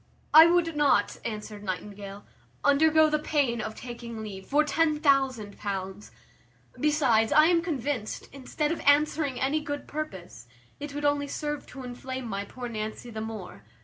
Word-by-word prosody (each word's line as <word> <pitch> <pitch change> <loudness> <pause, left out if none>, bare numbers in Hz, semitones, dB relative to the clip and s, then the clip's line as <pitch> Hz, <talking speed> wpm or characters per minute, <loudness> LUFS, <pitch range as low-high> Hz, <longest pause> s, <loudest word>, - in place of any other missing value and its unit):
"I 320 +2 +10
would 335 -2 +2
not," 285 -8 +2
answered 210 -2 -6
Nightingale, 200 +1 -6 0.4
"undergo 315 +2 +5
the 305 0 +1
pain 275 -7 0
of 220 - -5
taking 235 -2 -7
leave, 190 -3 -8
for 295 +2 +3
ten 305 0 +1
thousand 265 -8 +1
pounds; 195 0 -5 0.7
besides, 270 -8 +3
I 305 +1 +7
am 340 0 +4
convinced, 285 - -3
instead 290 +3 -2
of 335 - -2
answering 290 -1 +2
any 285 +4 +1
good 290 -1 -5
purpose, 190 - -7 0.3
it 285 0 -7
would 290 0 -3
only 285 0 +1
serve 295 0 -4
to 265 0 -9
inflame 255 0 -6
my 200 -2 -3
poor 245 +4 -7
Nancy 220 +1 -5
the 220 -1 -5
more. 210 - -7
260 Hz, 155 wpm, -27 LUFS, 215-295 Hz, 0.7 s, I